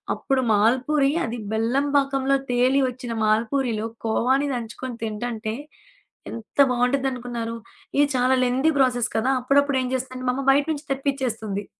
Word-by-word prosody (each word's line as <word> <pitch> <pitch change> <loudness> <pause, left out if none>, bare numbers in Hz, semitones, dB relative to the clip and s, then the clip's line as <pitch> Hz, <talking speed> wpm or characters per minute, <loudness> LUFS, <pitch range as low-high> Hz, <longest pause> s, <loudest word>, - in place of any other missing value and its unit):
అప్పుడు 270 -1 0
మాల్పూరి 260 +7 +2
అది 235 +1 -5
బెల్లం 240 +6 +1
పాకంలో 275 0 +1
తేలి 250 +3 +3
వచ్చిన 245 -1 -6
మాల్పూరిలో 225 +1 0 0.2
కోవాని 260 +5 +1
దంచుకొని 240 +1 -6
తింటంటే 220 0 -3 0.8
ఎంత 230 +4 -10
బావుండిద్దనుకున్నారు, 245 -2 -1 0.4
ఇది 290 - +6
చాలా 255 +1 +3
లెంథీ 255 +5 +2
ప్రాసెస్ 245 -3 +2
కదా! 225 +4 +1
అప్పుడప్పుడు 280 +2 +2
ఏం 255 - -2
చేస్తుందంటే 255 0 -4
మా - - +2
అమ్మ 275 - -3
బయట 285 +1 +3
నుంచి 295 -1 -5
తెప్పిచ్చేస్తుంది. 245 -7 -2
250 Hz, 130 wpm, -23 LUFS, 230-270 Hz, 0.8 s, ఇది